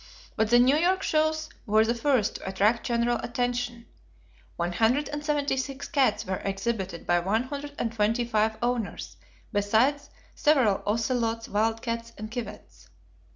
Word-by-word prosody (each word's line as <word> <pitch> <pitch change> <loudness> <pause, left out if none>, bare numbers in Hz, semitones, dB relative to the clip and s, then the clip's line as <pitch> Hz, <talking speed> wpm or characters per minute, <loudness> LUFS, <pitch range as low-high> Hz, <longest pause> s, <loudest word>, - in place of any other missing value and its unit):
But 220 -1 +1
the 240 - +6
New 255 +4 +5
York 370 +4 +2
shows 315 0 +1 0.2
were 215 +1 +4
the 235 - +1
first 245 -3 +1
to - - -6
attract 210 +5 +1
general 235 0 +1
attention. 245 -1 -2 0.7
One 175 +1 -2
hundred 245 +9 +2
and 295 0 -5
seventy 290 -3 0
six 270 +1 -4
cats 270 -9 +1
were 190 0 -2
exhibited 195 -3 -3
by 175 0 +3
one 205 +7 0
hundred 285 +2 -6
and 230 -1 -2
twenty 225 +2 +1
five 220 -1 +1
owners, 240 -3 -2 0.4
besides 225 +8 +2 0.2
several 260 -10 +3
ocelots, 230 +1 0
wild 225 +2 0
cats, 230 -1 -4
and 215 +1 -7
civets. 245 -2 -8
235 Hz, 155 wpm, -27 LUFS, 215-265 Hz, 0.7 s, the